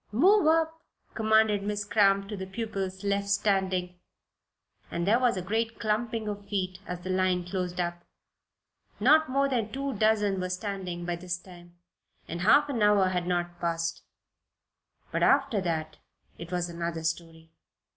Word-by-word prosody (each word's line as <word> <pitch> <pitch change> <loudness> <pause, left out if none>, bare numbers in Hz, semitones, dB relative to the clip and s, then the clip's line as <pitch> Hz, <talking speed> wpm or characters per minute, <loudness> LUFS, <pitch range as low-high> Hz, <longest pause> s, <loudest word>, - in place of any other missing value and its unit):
"Move 350 - +5
up," 320 0 +2 0.3
commanded 220 -2 +3
Miss 205 0 -2
Cramp 200 -2 +3
to 210 - -5
the 190 -1 -6
pupils 195 -2 -4
left 200 0 0
standing, 190 -3 0 0.9
and 170 0 -2
there 220 +5 +4
was 245 -6 +2
a 185 - -3
great 225 +4 -2
clumping 220 0 -1
of 205 -1 -5
feet 185 -2 -2
as 180 0 -5
the 185 +1 -4
line 185 -1 +1
closed 180 -1 -3
up. 175 0 -2 1.0
Not 315 -2 +5
more 275 +1 +2
than 235 -6 -1
two 275 +1 -3
dozen 210 -2 +2
were 185 0 -2
standing 185 -2 -4
by 175 0 -2
this 180 0 -3
time, 175 -1 -15 0.5
and 170 +1 -5
half 280 +10 +5
an 260 -6 -2
hour 205 -2 +4
had 180 -1 -2
not 175 -1 -2
passed. 165 -1 -2 1.1
But - - -1
after 275 -7 +3
that 160 -3 -3 0.4
it 170 +1 -8
was 175 -1 -1
another 170 -1 -4
story. 165 0 -4
195 Hz, 155 wpm, -28 LUFS, 175-220 Hz, 1.1 s, Move